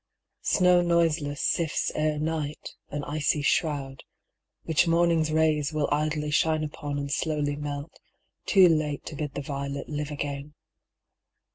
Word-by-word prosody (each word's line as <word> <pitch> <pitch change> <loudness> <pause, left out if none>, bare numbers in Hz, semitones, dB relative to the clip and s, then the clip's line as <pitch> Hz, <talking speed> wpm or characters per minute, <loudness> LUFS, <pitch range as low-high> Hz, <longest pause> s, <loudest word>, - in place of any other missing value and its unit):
Snow 180 -1 +4
noiseless 165 -4 +1
sifts 165 -3 0
Ere 155 0 0
night, 155 -1 -3 0.2
an 145 0 -4
icy 150 0 0
shroud, 140 -4 0 0.6
which 165 +2 +2
morning's 165 -2 +3
rays 155 -1 +2
Willidly 150 0 0
shine 155 +1 +2
upon 145 -1 -4
and 140 0 -4
slowly 150 -2 0
melt, 145 +1 -6 0.5
Too 190 -2 +7
late 155 -3 0
to 155 - -7
bid 150 -1 -4
the 145 - -3
violet 140 0 -4
live 150 -1 -3
again. 145 0 -5
150 Hz, 130 wpm, -27 LUFS, 145-160 Hz, 0.6 s, Too